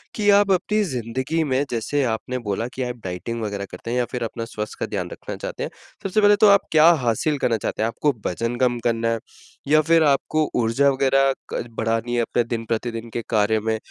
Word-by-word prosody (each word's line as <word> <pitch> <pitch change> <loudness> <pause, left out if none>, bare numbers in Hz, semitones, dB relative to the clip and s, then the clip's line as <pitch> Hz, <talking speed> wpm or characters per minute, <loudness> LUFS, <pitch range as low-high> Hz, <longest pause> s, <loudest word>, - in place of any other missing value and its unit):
कि 205 -1 +1
आप 200 -1 +3
अपनी 210 +4 +2
ज़िन्दगी 130 - -2
में 135 -1 +1
जैसे 120 +5 0
आपने 125 +3 -4
बोला 105 +4 -1
कि 130 - -3
आप 125 0 -3
डाइटिंग 95 +6 -4
वग़ैरह 100 -2 -3
करते 105 +6 -7
हैं 125 - 0
या 125 - +2
फिर 125 -2 -3
अपना 115 0 -4
स्वास्थ्य 105 -2 -6
का - - -1
ध्यान - - -2
रखना - - -7
चाहते - - -5
हैं। - - -3 0.3
सबसे 195 +2 +1
पहले 205 0 +6
तो 215 - +8
आप 200 0 +6
क्या 155 +1 +6
हासिल 125 +6 0
करना 115 -2 +1
चाहते 110 - -3
हैं? 110 - +2
आपको 145 +5 0
वजन 115 +6 -2
कम 120 -2 +2
करना 115 -1 +1
है? 115 -1 0 0.5
या 155 +1 +5
फिर 165 +1 +4
आपको 150 +2 +1
ऊर्जा 115 +5 +3
वग़ैरह 135 0 +3 0.2
क - - -1
बढ़ानी 115 +2 -1
है 120 - +2
अपने 120 +1 0
दिन-प्रतिदिन 115 0 -3
के 120 - -2
कार्य 110 -1 +2
में? 110 +1 -1
120 Hz, 215 wpm, -22 LUFS, 115-145 Hz, 0.5 s, तो